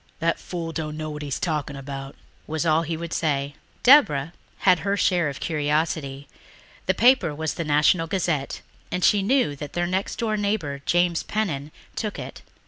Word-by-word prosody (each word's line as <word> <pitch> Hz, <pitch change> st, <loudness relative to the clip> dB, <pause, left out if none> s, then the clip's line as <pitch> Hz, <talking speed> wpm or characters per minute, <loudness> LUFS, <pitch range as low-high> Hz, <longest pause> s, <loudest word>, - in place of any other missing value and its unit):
"That 165 Hz, 0 st, 0 dB
fool 170 Hz, -2 st, -5 dB
dunno 155 Hz, -1 st, -4 dB
what 150 Hz, 0 st, -6 dB
he's 145 Hz, -3 st, -3 dB
talking 150 Hz, -4 st, -2 dB
about," 135 Hz, 0 st, -7 dB, 0.3 s
was 160 Hz, +1 st, -2 dB
all 160 Hz, 0 st, +4 dB
he 165 Hz, 0 st, -3 dB
would 170 Hz, 0 st, -5 dB
say. 145 Hz, -3 st, 0 dB, 0.3 s
Deborah 165 Hz, -, +6 dB, 0.3 s
had 180 Hz, -3 st, +6 dB
her 200 Hz, +3 st, 0 dB
share 175 Hz, -6 st, +2 dB
of 140 Hz, -, -7 dB
curiosity. 150 Hz, -3 st, -1 dB, 0.6 s
The 190 Hz, -, +2 dB
paper 240 Hz, -, +4 dB
was 160 Hz, 0 st, -2 dB
the 170 Hz, -, -3 dB
National 150 Hz, +3 st, +3 dB
Gazette 165 Hz, -6 st, -1 dB, 0.3 s
and 180 Hz, -, -2 dB
she 205 Hz, -, +4 dB
knew 220 Hz, -, +2 dB
that 145 Hz, 0 st, -7 dB
their 175 Hz, 0 st, 0 dB
next 185 Hz, +3 st, -1 dB
door 220 Hz, -2 st, -1 dB
neighbour, 195 Hz, -10 st, -1 dB
James 175 Hz, -1 st, +2 dB
Pennan, 155 Hz, -9 st, -2 dB, 0.2 s
took 215 Hz, -2 st, -3 dB
it. -, -, -8 dB
160 Hz, 170 wpm, -24 LUFS, 145-180 Hz, 0.6 s, Deborah